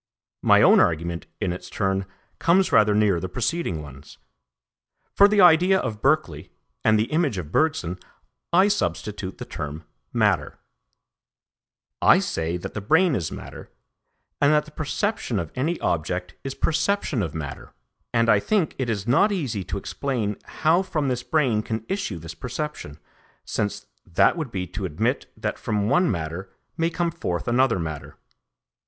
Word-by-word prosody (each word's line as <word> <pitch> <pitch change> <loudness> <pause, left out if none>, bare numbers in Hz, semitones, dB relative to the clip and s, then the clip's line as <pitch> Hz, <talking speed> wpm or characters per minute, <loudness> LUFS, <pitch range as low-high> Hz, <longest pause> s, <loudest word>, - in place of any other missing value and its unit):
My - - +5
own - - +7
argument 85 +1 0
in 90 -4 -1
its 90 0 -9
turn 95 -1 -1 0.3
comes 185 +3 +3
rather 105 -1 +5
near 105 -4 +3
the 95 - -5
preceding 110 - -2
ones. 70 0 -13 1.0
For 200 - +7
the 205 -1 +3
idea 180 +2 +6
of 110 - -3
Berkeley, 135 - +1 0.3
and 110 - +4
the 110 - +2
image 155 - +1
of 80 -4 -5
Bergson, 95 - 0 0.5
I 185 +3 +5
substitute 95 - -2
the - - -7
term 75 +2 -6 0.3
matter. - - +1 1.4
I - - +7
say 80 +2 -2
that 85 - -7
the 105 - -4
brain 160 - +3
is 85 -10 -2
matter, - - -9 0.7
and 145 +1 +5
that 150 0 +3
the 155 - -14
perception 155 - -2
of 85 -4 -3
any 160 +7 -1
object 90 +2 -2
is 135 0 -5
perception 165 - 0
of 80 -5 -3
matter, 70 -4 -6 0.4
and 115 -1 +2
I 105 -3 +5
think 190 - 0
it 130 -3 -1
is 100 -3 -2
not 140 - +4
easy 130 - -2
to - - -4
explain 110 0 -2
how 160 +3 +2
from 155 -7 -1
this 125 -1 -1
brain 125 -7 +1
can 110 0 -4
issue 195 - -2
this 80 0 -8
perception, 125 - -5 0.5
since 105 -1 -2 0.2
that 85 - +3
would 160 -6 -4
be 95 -3 -3
to 95 +3 -5
admit 80 -5 -1
that - - -3
from 105 -1 -1
one 180 +4 +3
matter 85 +3 -4 0.2
may 165 0 +1
come 170 0 -1
forth 105 - -3
another 130 +1 +3
matter. 80 -4 -6
110 Hz, 160 wpm, -24 LUFS, -, 1.4 s, own